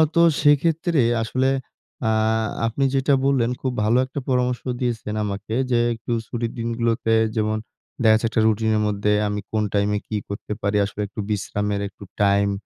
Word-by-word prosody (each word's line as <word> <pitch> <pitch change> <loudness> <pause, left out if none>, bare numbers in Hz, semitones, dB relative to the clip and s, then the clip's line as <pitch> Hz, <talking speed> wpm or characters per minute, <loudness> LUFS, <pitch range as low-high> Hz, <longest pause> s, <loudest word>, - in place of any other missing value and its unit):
তো 170 - +5 0.2
সেক্ষেত্রে 155 +2 +3 0.2
আসলে 130 +4 +1 0.6
আ 110 - +3 0.6
আপনি 115 +5 -1
যেটা 135 +1 +2
বললেন 130 -4 +2
খুব 130 - -1
ভালো 110 +3 +3
একটা 135 +2 -5
পরামর্শ 125 -1 +1 0.2
দিয়েছেন 115 -3 -2
আমাকে 105 +2 -4 0.2
যে 120 - +4
একটু 115 +1 -7 0.2
ছুটির 115 -1 -3
দিনগুলোতে 115 -1 0 0.2
যেমন 110 0 +1 0.5
দেখা 110 -1 +6
গেছে 110 - 0
একটা 110 - +1
routine 110 0 +1
এর 105 - +1
মধ্যে 105 0 0 0.2
আমি 105 0 -2
কোন 110 -1 +1
time 100 0 +2
এ - - -2
কি 110 - -4
করতে 100 +1 -5
পারি? 100 +1 +1
আসলে 100 +1 -6
একটু 100 - -10
বিশ্রামের 105 0 -1
একটু 100 - -13 0.2
time। 100 0 +3
110 Hz, 170 wpm, -22 LUFS, 105-125 Hz, 0.6 s, দেখা